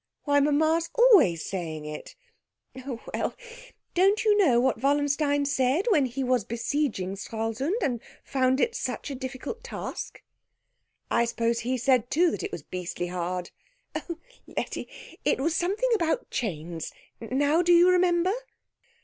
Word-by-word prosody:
"Why, 285 -1 +3
mamma's 315 +3 +2
always 405 - +5
saying 160 -5 -4
it." 150 0 -8 0.7
"Oh, 245 -4 -5
well. - - -2 0.6
Don't 390 +5 +3
you 425 -1 +5
know 305 -13 +4
what 245 -2 +1
Wallenstein 285 +1 +2
said 275 +5 +1
when 295 -9 +4
he 260 +2 -3
was 250 -3 +2
besieging 230 -4 -2
Stralsund 225 - -2
and 240 -4 -1 0.2
found 260 -1 +1
it 470 - +2
such 290 - -4
a - - -4
difficult 260 - -6
task?" 480 - -6 0.9
"I 235 - +3
suppose 235 0 0
he 255 +2 -1
said 250 -1 +2
too 335 +4 +3
that - - -4
it 405 - -4
was - - -6
beastly 175 -1 -5
hard." 180 0 -3 0.4
"Oh, 340 -2 -5 0.3
Letty - - -4 0.4
it - - +2
was 320 +4 0
something 410 +8 0
about 415 +3 0
chains. 165 -6 -4 0.3
Now 285 +7 +1
do 350 0 +2
you 345 +1 +7
remember?" 360 0 +3
275 Hz, 145 wpm, -27 LUFS, 230-340 Hz, 0.9 s, you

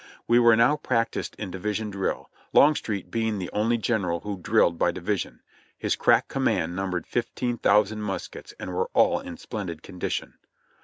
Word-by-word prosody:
We 120 +1 +5
were 120 -2 +6
now 115 +6 +4
practiced 115 -6 -1
in 100 -4 -6
division 105 +3 -3
drill, 95 -1 -3 0.2
Longstreet 110 -10 +3
being 110 -2 0
the 90 -2 -5
only 115 +3 +2
general 100 -7 -1
who 100 -2 -5
drilled 85 0 +2
by - - +3
division. - - -3 0.4
His - - 0
crack - - +3
command 85 +2 0
num 95 0 -2
bered 90 -2 -2
fifteen 120 0 -2
thousand 105 +1 +3
muskets 95 -3 -5
and - - -5
were 465 +2 -1
all - - +4
in 270 -2 -8
splendid 90 - -6
condition. 90 -2 -4
105 Hz, 165 wpm, -26 LUFS, 95-120 Hz, 0.4 s, were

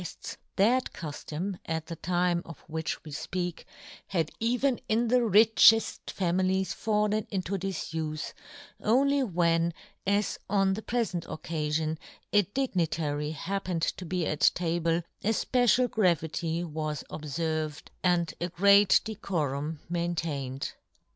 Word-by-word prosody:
1 - - -7
1 - - -1
guefts, - - -8 0.2
that 240 +6 +3
cuftom, 170 +2 -5
at 160 -1 -2
the 165 0 -6
time 175 +1 +1
of 165 - -11
which 160 0 -4
we 155 - -9
fpeak, 175 +3 -4 0.4
had 165 -5 -1
even 245 +3 +1
in 225 +2 +2
the 250 +1 +5
richefl 225 0 +5
families 185 +1 0
fallen 210 0 0
into 195 0 -2
difufe, 160 -5 -3 0.5
only 275 +5 +3
when, 170 -6 +2 0.4
as 200 0 +1
on 195 -1 +3
the 210 - -4
prefent 220 -8 -1
occa 155 -1 -4
fion, 155 +1 0 0.4
a 205 - +7
dignitary 165 - -1
happened 175 +2 -3
to 185 - -1
be 180 0 -1
at 150 0 -2 0.2
table, 170 -1 0 0.2
a 210 - +1
fpecial 245 +2 +3
gravity 170 -5 0
was 155 -2 -3
obferved, 155 0 -3
and 175 -2 +2
a 175 - -1
great 200 +3 +6
decorum 155 -8 -3
maintained. 165 -6 -2
175 Hz, 130 wpm, -29 LUFS, 160-205 Hz, 0.5 s, a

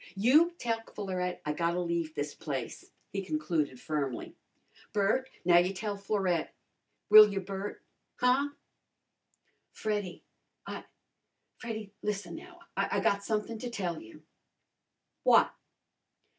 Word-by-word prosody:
"You 300 - +5
tell 230 -5 -1
Florette 185 -3 -3
I 150 - 0
gotta 170 +3 0
leave 170 -2 -1
this 145 0 -2
place," 135 -6 -5 0.2
he 195 -1 -2
concluded 165 - -1
firmly. 140 -5 -3 0.6
"Bert, 220 +6 +2 0.2
now 175 -1 +7
you 180 +2 +1
tell 205 +1 -2
Florette. 195 -4 -1 0.6
Will 215 -1 +11
you, 195 - -1
Bert? 195 +1 -5 0.3
Huh?" 255 +3 +3 1.2
"Freddy 205 -4 -3 0.4
I - - -6 0.7
Freddy, 220 -3 -6
lissen 200 -4 -3
now. 350 - -11
I 200 +1 +1
got 200 +1 +2
somethin' 215 +1 -2
to 245 - -4
tell 180 -8 -3
you." 110 - -14 1.0
"What?" - - +5
195 Hz, 115 wpm, -31 LUFS, 170-215 Hz, 1.2 s, Will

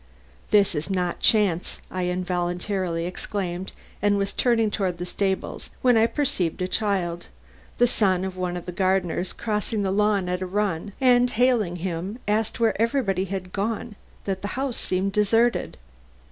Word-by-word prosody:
"This 205 -2 +4
is 155 +3 -3
not 180 -2 -1
chance," 200 -6 +2
I 185 -1 -1
involuntarily 180 0 -1
exclaimed, 180 0 -4 0.3
and 205 0 +3
was 200 0 -1
turning 225 -3 +2
toward 185 -4 -1
the 175 - -4
stables 190 +1 -2
when 250 -2 +5
I 225 0 +5
perceived 255 - -1
a - - 0
child, 185 -5 -1 0.5
the 245 - +5
son 190 -6 +2
of 190 -1 -5
one 180 -1 -2
of 175 - -7
the 180 - -4
gardeners, 185 -1 0
crossing 210 -1 -2
the 190 - 0
lawn 205 -2 +2
at 180 +1 -2
a 185 - -2
run, 200 -1 -1
and 250 -2 +5
hailing 235 -7 +2
him, 180 +4 -4
asked 215 +2 0
where 225 -2 +2
everybody 225 -6 +1
had 185 -1 -5
gone 215 +2 -2 0.3
that 190 -1 -2
the 205 - -3
house 265 -3 -1
seemed 190 +2 -1
deserted. 225 +4 +2
195 Hz, 160 wpm, -25 LUFS, 180-215 Hz, 0.5 s, when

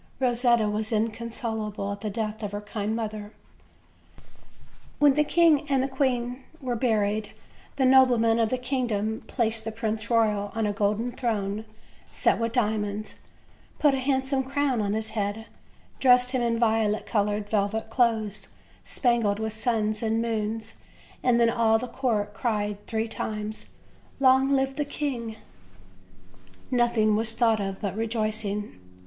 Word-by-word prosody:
Rosetta 240 -3 +2
was 215 +1 -2
inconsolable 220 -2 -2
at 200 0 -6
the 215 - -2
death 215 +1 -3
of 205 -1 -4
her 205 - -3
kind 210 +1 -3
mother. 215 -2 -5 1.6
When 290 -2 +5
the 300 +2 +3
king 315 -2 +3
and 270 -1 +2
queen 255 -1 -1 0.2
were 255 -3 -2
buried 215 -3 0 0.4
the 265 - +2
noblemen 245 -3 +5
of 225 -1 +2
the 255 - 0
kingdom 235 -4 -1
placed 225 -3 0
the 225 - -4
Prince 220 0 -3
Royal 210 -3 +2
on 225 -1 0
a 205 - 0
golden 210 +3 0
throne 215 -4 -2 0.5
set - - +2
with 230 0 -1
diamonds, 215 -2 -1 0.6
put 290 -2 +4
a 270 - 0
handsome 265 0 0
crown 275 -3 0
on 200 -1 -1
his 220 0 -1
head, 210 +1 -2 0.5
dressed 250 -1 +5
him 255 -2 0
in 235 -1 +1
violet 220 -2 +1
colored 205 -1 0
velvet 215 +1 -1
clothes 225 -4 +1 0.4
spangled 235 -5 +1
with 220 0 -2
suns 215 -1 -1
and 225 0 0
moons, 225 -1 -3 0.4
and 245 -2 +3
then 230 -1 +4
all 225 -1 +3
the 250 +3 -4
court 220 -6 -1
cried 205 -2 -2
three 220 0 -1
times: 215 -1 -5 0.5
"Long 265 0 +5
live 270 0 +1
the 295 - +1
king!" 260 -6 -4 1.4
Nothing 235 -4 +3
was 225 +1 -1
thought 225 -3 +3
of 195 -1 -4
but 200 -3 -3
rejoicing. 215 - -2
225 Hz, 145 wpm, -26 LUFS, 210-245 Hz, 1.6 s, When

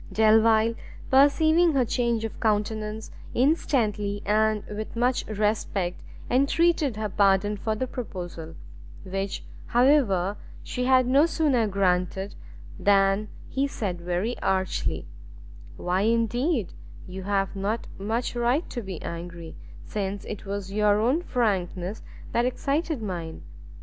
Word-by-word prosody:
Delvile, 220 +1 +4 0.4
perceiving 315 +5 +5
her 260 -3 +3
change 235 -1 0
of 225 - -7
countenance, 215 0 -1 0.2
instantly, 215 -8 +1
and 215 0 +2
with 215 +2 -6
much 245 +2 +1
respect, 210 -4 -1 0.3
entreated 280 0 +2
her 215 0 -1
pardon 200 +1 +2
for 215 +2 -2
the 260 - -1
proposal; 175 -10 -7 0.5
which, 195 +1 -4 0.2
however, 235 -7 +3 0.3
she 250 - -3
had 255 0 +5
no 275 +6 +4
sooner 285 -8 +2
granted, 190 0 0 0.5
than 200 +1 +3 0.2
he 275 +1 0
said 190 -10 -4
very 180 +7 -1
archly, 190 -1 -1 0.7
"Why 180 +2 0
indeed 230 - +1 0.3
you 185 +1 -7
have 195 0 -1
not 205 +4 -2
much 225 +5 -2
right 240 +7 +1
to 240 - -4
be 190 -5 -6
angry, 170 -1 -7 0.3
since 200 -1 -4
it 210 -1 -7
was 200 -1 -4
your 210 0 +3
own 255 +10 +2
frankness 195 - -1 0.3
that 235 - +2
excited 280 +1 -1
mine. 170 -5 -5
215 Hz, 120 wpm, -26 LUFS, 195-245 Hz, 0.7 s, perceiving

